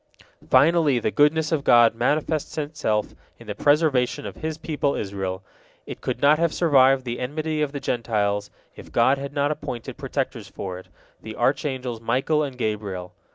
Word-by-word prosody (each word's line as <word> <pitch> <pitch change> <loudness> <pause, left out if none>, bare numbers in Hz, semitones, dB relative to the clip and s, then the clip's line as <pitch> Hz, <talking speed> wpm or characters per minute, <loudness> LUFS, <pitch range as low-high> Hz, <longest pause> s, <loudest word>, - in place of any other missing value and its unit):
Finally, 145 0 +4
the 110 - -1
goodness 150 - +2
of 155 -4 0
God 120 -3 +6
manifests 150 +6 -1
itself 145 -9 -2 0.2
in - - -14
the - - -4
preservation 145 -6 +2
of 100 -2 -7
His 155 0 -4
people 150 -3 -1
Israel. 95 -2 -4 0.4
It - - -8
could - - -3
not 150 +2 +4
have 170 -1 +2
survived 135 -5 +4
the 120 0 -4
enmity 155 +4 -2
of 150 -2 0
the 140 - -5
Gentiles, 105 -5 -1 0.3
if - - -12
God 130 +4 +3
had 140 0 -5
not 145 0 0
appointed 120 -6 -6
protectors - - -3
for 90 -2 -6
it, 95 - -15 0.3
the 110 0 -8
archangels 130 -2 -1
Michael 130 +7 +1
and 135 -4 -4
Gabriel. 105 -6 -3
130 Hz, 165 wpm, -24 LUFS, 110-150 Hz, 0.4 s, God